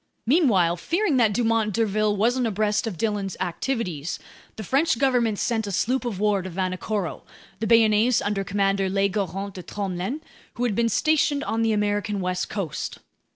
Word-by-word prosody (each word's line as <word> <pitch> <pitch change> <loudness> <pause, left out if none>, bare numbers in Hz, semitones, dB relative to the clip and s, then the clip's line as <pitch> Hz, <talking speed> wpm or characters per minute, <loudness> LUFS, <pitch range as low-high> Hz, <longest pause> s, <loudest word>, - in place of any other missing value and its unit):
Meanwhile, 220 - +3
fearing 335 - 0
that 225 -4 +4
Dumont 225 -1 +1
d'Urville 215 -2 +1
wasn't 240 +4 +2
abreast 210 +1 0
of 195 -6 -4
Dillon's 205 -1 -2
activities, 180 - -2 0.4
the 220 - -6
French 275 - +2
government 240 -5 +2
sent 225 -2 -1
a - - -3
sloop 250 +7 0
of 215 -6 -3
war 205 -2 +2
to 185 - -6
Vanikoro, 185 +1 -3 0.4
the 220 - -1
Bayonnaise 225 +1 +4
under 205 -1 -1
Commander 195 0 0
Legoarant 195 0 -1
de 185 - -7
Tromelin, 195 - -4 0.4
who 245 - -2
had 240 -4 +1
been 230 +3 +1
stationed 290 +3 +2
on 225 +2 -1
the 225 -1 +2
American 205 0 0
west 180 -1 -2
coast. 195 -8 -4
210 Hz, 160 wpm, -24 LUFS, 195-230 Hz, 0.4 s, that